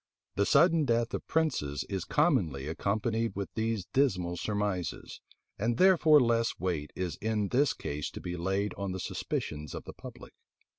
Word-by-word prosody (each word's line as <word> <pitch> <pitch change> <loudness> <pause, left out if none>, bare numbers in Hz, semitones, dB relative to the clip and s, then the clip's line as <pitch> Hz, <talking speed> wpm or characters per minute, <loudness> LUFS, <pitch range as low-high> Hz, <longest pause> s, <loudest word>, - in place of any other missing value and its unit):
The 100 - +1
sudden 170 -2 +5
death 115 -2 +1
of - - -4
princes 100 - 0
is 95 -3 -3
commonly 95 - +1
accompanied 110 +6 -1
with 95 -3 -5
these 110 -4 -1
dismal 95 -11 +1
surmises; 100 -2 -3 0.4
and 115 +3 0
therefore 165 -4 +6
less 115 -2 +1
weight 85 -5 -2
is 90 -4 -3
in 105 -2 -1
this 140 +3 +3
case 75 0 -4
to - - -6
be 90 0 -5
laid 95 +4 -1
on 100 -2 -2
the 95 - -4
suspicions 75 -4 -4
of - - -6
the - - -9
public. - - -11
100 Hz, 160 wpm, -30 LUFS, 90-120 Hz, 0.4 s, therefore